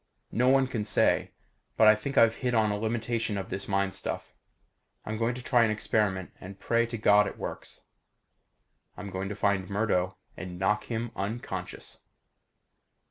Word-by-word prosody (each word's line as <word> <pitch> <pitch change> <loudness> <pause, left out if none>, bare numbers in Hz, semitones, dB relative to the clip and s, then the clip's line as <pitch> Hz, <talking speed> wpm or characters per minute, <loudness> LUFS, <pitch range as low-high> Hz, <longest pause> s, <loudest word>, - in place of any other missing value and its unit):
No 125 +2 +3
one 135 0 +5
can 120 -4 -3
say. 105 -1 +2 0.5
But 110 - +6
I 110 - +9
think 110 +6 -5
I've 115 0 +5
hit 125 -2 -1
on 110 -2 +3
a 105 - -1
limitation 115 -1 -1
of 95 - -5
this 95 +1 -3
mind 100 -1 0
stuff. - - -5 0.7
I'm 110 - -3
going 115 +2 0
to 125 - -8
try 120 -2 +4
an 115 - +2
experiment 105 -3 0
and 95 +1 -10
pray 115 +2 +1
to 115 0 -5
God 105 -1 +5
it - - -7
works. - - -7 1.2
I'm 100 - -7
going 95 +1 -3
to 105 - -4
find 100 -2 0
Murdo 100 -3 0 0.2
and 90 -1 -7
knock 105 +3 +1
him 115 0 -3
unconscious. 105 +5 -5
105 Hz, 170 wpm, -28 LUFS, 100-115 Hz, 1.2 s, I